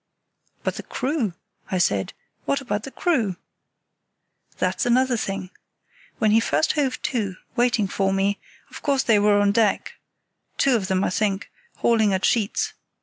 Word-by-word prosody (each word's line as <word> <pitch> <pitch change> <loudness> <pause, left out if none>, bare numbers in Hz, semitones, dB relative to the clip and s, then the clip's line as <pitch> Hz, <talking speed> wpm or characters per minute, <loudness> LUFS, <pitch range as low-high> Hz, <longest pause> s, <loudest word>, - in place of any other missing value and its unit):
"But - - -2
the - - -4
crew?" 255 - -2 0.3
I 185 - 0
said; 100 - +1 0.3
"what 280 - +1
about 225 -5 -3
the - - -6
crew?" 245 - 0 1.2
"That's - - 0
another 250 +1 +3
thing. 195 -4 -4 0.7
When 215 -2 +2
he 220 - +6
first 230 - +1
hove 270 -4 0
to, 210 -7 -1 0.2
waiting 240 -4 +2
for 195 0 0
me, 195 +1 +1 0.3
of - - -9
course 275 -2 +1
they 215 -3 +4
were 205 0 +4
on 205 0 +3
deck 210 -1 +1 0.6
(two 270 -2 +3
of 200 -5 -1
them, 190 0 +1
I - - 0
think) 205 0 -1 0.3
hauling 220 -4 +3
at 190 - 0
sheets. 215 -4 +1
215 Hz, 155 wpm, -23 LUFS, 195-245 Hz, 1.2 s, he